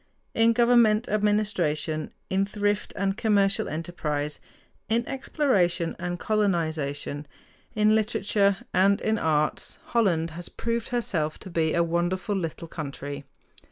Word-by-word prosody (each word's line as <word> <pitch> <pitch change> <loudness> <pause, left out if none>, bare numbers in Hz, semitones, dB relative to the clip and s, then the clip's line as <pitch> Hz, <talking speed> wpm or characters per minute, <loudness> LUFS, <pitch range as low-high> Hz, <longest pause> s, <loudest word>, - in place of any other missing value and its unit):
In 230 0 +4
government 235 -2 +4
administration, 200 -8 0 0.2
in 190 +1 +2
thrift 205 0 -1
and 195 0 0
commercial 200 -3 +2
enterprise, 150 -2 -3 0.5
in 230 +1 +1
exploration 200 - 0
and 175 0 -3
colonization, 160 -8 -1 0.5
in 215 0 +4
literature, 205 -2 +2 0.2
and 200 +2 +4
in 220 -1 0
arts, 155 -1 0 0.2
Holland 170 -8 +2
has 170 +2 -7
proved 230 0 -3
herself 185 -11 -1
to 190 - -9
be 160 -2 +1
a 170 - +3
wonderful 175 +4 -1
little 165 -2 -4
country. 140 -3 -6
190 Hz, 120 wpm, -26 LUFS, 160-215 Hz, 0.5 s, In